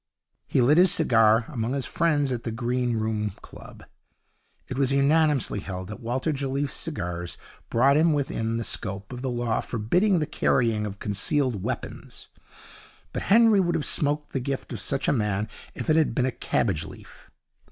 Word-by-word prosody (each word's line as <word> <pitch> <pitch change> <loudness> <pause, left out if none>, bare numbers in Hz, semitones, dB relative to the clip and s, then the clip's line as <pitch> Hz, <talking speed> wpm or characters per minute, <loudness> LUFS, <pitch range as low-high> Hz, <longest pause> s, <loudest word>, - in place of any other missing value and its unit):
He 125 - +2
lit 150 +7 +5
his 180 0 +6
cigar. 115 - +4
Among 120 -3 -3
his 140 -2 -2
friends 150 -5 +1
at 120 -2 -2
the 120 - -4
Green 120 +1 -1
Room 110 -2 -1
Club - - -13 0.8
it 130 - -5
was 135 0 +1
unanimously 140 -3 +2
held 95 -1 -6
that 105 - -7
Walter 130 +6 -1
Jelliffe's 140 0 -2
cigars 90 - -4 0.3
brought 135 +5 +4
him 160 +1 +4
within 115 -6 -1
the 115 - -2
scope 100 +2 -5
of 125 - -6
the 130 - -2
law 120 -2 -1
forbidding 175 - +1
the 155 - 0
carrying 115 -7 +1
of 100 0 -7
concealed 105 +3 0
weapons; - - -6 0.8
but - - -3
Henry 225 0 +6
would 175 -2 +1
have 155 - -1
smoked 150 0 -1
the 135 - 0
gift 135 +1 -4
of - - -5
such 135 0 0
a - - +3
man 105 -3 0 0.3
if - - -6
it 155 - +4
had 160 -2 +2
been 130 - +2
a 130 - 0
cabbage 95 -9 -1
leaf. 80 - -14
125 Hz, 175 wpm, -25 LUFS, 110-145 Hz, 0.8 s, his